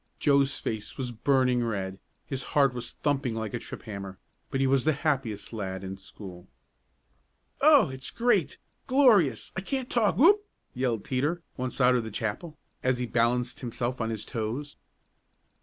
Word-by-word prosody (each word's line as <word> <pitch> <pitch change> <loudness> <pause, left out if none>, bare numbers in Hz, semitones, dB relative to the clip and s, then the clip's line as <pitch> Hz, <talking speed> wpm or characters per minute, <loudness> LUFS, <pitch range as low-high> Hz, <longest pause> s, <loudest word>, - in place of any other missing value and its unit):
Joe's 140 -1 +3
face 105 -2 -4
was 125 -2 -2
burning 125 +1 +2
red, 95 -4 -3 0.3
his 135 -2 -3 0.2
heart 140 -3 +5
was 120 -1 -6
thumping 140 -5 +1
like 110 -2 -4
a 120 - -2
trip - - -9
hammer, 100 -3 -7 0.3
but 135 - -2
he 135 - +3
was 135 -1 +3
the 155 - +3
happiest 135 -9 -2
lad 95 -3 -4
in 95 0 -5
school. 95 -2 -11 1.1
"Oh, 295 - +7
it's 130 0 -5
great! 220 - +1 0.3
Glorious! 250 - +4
I 190 - -2
can't 260 +5 -3
talk! 220 -4 +2
Whoop!" 405 - +6 0.3
yelled 125 -4 -1
Teeter, 150 +7 -1
once 130 0 -3
out 125 0 +5
of 115 -3 -1
chapel, 115 - -4 0.2
as 130 -1 +1
he 125 - -2
balanced 120 +1 +1
himself 120 0 -3
on 110 - -1
his 110 -2 -4
toes. 125 +5 -4
125 Hz, 160 wpm, -28 LUFS, 110-145 Hz, 1.1 s, Oh